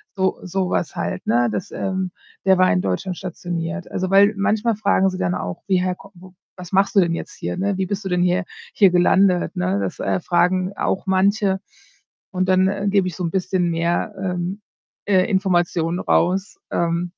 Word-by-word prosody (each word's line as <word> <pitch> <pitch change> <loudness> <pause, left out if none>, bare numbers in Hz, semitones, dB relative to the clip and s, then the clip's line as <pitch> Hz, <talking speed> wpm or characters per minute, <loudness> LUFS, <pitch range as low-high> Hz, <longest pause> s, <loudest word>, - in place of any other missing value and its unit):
so 190 -1 0
sowas 185 -2 -2
halt, 90 +1 -3
ne 120 +1 +2
dass, 105 - -4
ähm: 190 -1 -2 0.3
„Der 190 -1 +5
war 185 - +5
in 90 0 +2
Deutschland 100 - -2
stationiert.“ 175 0 -5
Also, 185 0 -2
weil 200 +2 +6
manchmal 215 +3 +1
fragen 200 -2 +2
sie 185 - -5
dann 90 - 0
auch: 90 -1 -5
„Wie, 185 -2 +2
hä, 180 -1 -1 0.2
wo 185 0 -15 0.2
was 180 -2 -10
machst 195 +2 +2
du - - +7
denn 170 -3 +2
jetzt - - -7
hier, - - -4
ne? 195 +1 -1
Wie 190 -1 -1
bist 200 +1 -4
du 190 - -2
denn 180 0 +1
hier 180 +2 +2 0.3
hier 195 -4 +5
gelandet, 180 +1 +3
ne?“ 90 +2 0
Das, 95 -2 -4
äh, 95 -1 0
fragen 180 - +1
auch 190 - -1
manche 195 +1 +2 0.7
und 185 -1 -1
dann, 185 0 +4
äh, 200 +1 -2
gebe 195 -2 +2
ich 180 - -5
so 180 - -5
'n 165 - -2
bisschen 185 -2 0
mehr, 170 +5 -1
ähm, 180 +1 -3 0.4
äh, 190 -2 +3
Informationen 175 -3 +1
raus. 190 +5 0
Ähm. 170 +1 -1
185 Hz, 190 wpm, -21 LUFS, 175-195 Hz, 0.7 s, du